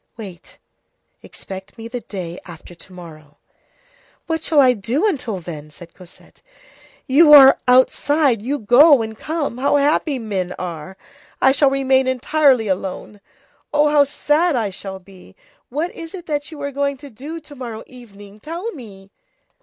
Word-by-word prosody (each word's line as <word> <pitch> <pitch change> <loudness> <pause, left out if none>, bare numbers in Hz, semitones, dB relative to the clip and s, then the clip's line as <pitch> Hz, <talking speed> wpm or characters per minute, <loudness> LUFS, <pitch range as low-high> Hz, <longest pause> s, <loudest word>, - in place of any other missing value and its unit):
Wait; 195 -6 -11 0.6
expect 190 +4 -11
me 225 0 -8
the 245 +1 -5
day 185 -6 -7
after 170 0 -12
to 175 - -15
morrow." 155 -5 -13 0.9
"What 320 -1 -2
shall 315 -2 +1
I 255 -2 +6
do 235 - -2
until 250 - -3
then?" 155 -3 -9
said 170 +2 -15
Cosette. 180 -2 -17 0.6
"You 300 +3 +5
are 270 -2 +9
outside, 260 0 +3
you 270 +6 -2
go, 255 +3 +5
and 220 0 -7
come! 295 -2 -4
How 280 +2 +1
happy 290 0 +1
men 195 -6 -4
are! 180 +1 -7 0.4
I 265 - +4
shall 280 0 +3
remain 265 -1 +1
entirely 260 -2 +2
alone! 195 +2 -5 0.5
Oh! 295 0 +3
How 295 -1 +5
sad 295 +3 0
I 220 -5 -1
shall 190 +1 -8
be! 190 0 -18 0.3
What 310 +7 -3
is 330 +2 -9
it 355 -2 -10
that 290 -2 -3
you 310 - -10
are 280 - -3
going 280 0 -2
to 285 0 -13
do 290 +9 -8
to 295 - -15
morrow 240 -5 -8
evening? 205 -5 -15
tell 340 - -6
me." 200 - -13
250 Hz, 160 wpm, -19 LUFS, 195-290 Hz, 0.9 s, are